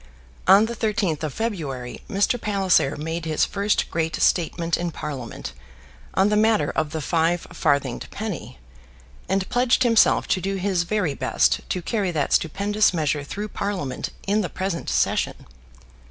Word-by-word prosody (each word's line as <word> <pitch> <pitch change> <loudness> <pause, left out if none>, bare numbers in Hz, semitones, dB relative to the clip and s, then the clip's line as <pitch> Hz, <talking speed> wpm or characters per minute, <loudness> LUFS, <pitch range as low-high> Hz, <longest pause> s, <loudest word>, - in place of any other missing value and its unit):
On 195 +3 +7
the 235 +1 -4
13th 205 -8 0
of 155 -2 -2
February 145 - -4
Mr. 215 +3 +1
Palliser 190 -8 +2
made 160 +2 -4
his 155 -1 +2
first 200 +1 0
great 160 -1 -1
statement 170 -1 +1
in 175 0 -2
Parliament 140 -6 -6 0.6
on 195 +2 +4
the 210 - +2
matter 220 0 +3
of 155 -1 -1
the 160 +1 -4
five 165 +2 +1
farthinged 140 -5 0
penny, 205 - -6 0.7
and 190 0 0
pledged 250 +1 +3
himself 230 -3 +4
to 185 - +1
do 195 +1 -2
his 185 -2 0
very 180 -5 0
best 130 -1 +2
to 180 - -2
carry 205 -2 -1
that 155 -5 -1
stupendous 200 +4 +2
measure 150 -2 0
through 205 +9 -5
Parliament 190 -12 -3 0.2
in 205 +2 +2
the 180 - -3
present 185 -1 -3
session. - - 0
180 Hz, 155 wpm, -23 LUFS, 155-205 Hz, 0.7 s, On